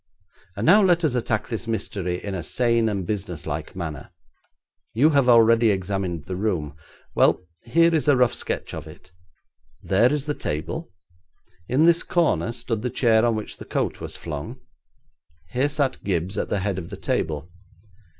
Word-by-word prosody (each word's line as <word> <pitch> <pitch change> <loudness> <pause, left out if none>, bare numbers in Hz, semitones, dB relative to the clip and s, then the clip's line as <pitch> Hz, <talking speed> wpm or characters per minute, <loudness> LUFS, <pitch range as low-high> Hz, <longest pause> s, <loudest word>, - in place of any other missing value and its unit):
And 100 - -2
now 200 +6 +7
let 175 -3 +3
us 145 - +1
attack 110 -3 -1
this 115 -1 -4
mystery 95 -5 -3
in 100 - -4
a 95 - -3
sane 115 +6 +1
and 100 -3 -2
businesslike 85 -7 -4
manner. 80 -5 -6 0.9
You 145 +7 +5
have 140 -4 +3
already 115 -1 +6
examined 95 -4 -2
the 90 +1 -4
room. 90 -8 -2 0.4
Well, - - +3 0.2
here 165 +7 +4
is 155 -2 +1
a 145 -3 +5
rough 125 -2 +3
sketch - - -4
of - - -7
it. - - -14 0.7
There 115 +7 +3
is 150 -1 -1
the 150 - -1
table; 110 - -4 0.8
in 140 +6 +3
this 170 0 +5
corner 170 -8 +1
stood 115 -2 -3
the 125 - -2
chair 115 -3 +3
on 120 -1 +2
which 110 - -6
the - - -9
coat - - -2
was - - -5
flung. 75 -3 -6 0.9
Here 130 +4 +1
sat 145 -2 -1
Gibbes 95 0 -1
at - - -2
the 100 - 0
head 100 -1 -1
of 85 - -8
the - - -7
table. 80 +2 -2
110 Hz, 170 wpm, -24 LUFS, 90-130 Hz, 0.9 s, now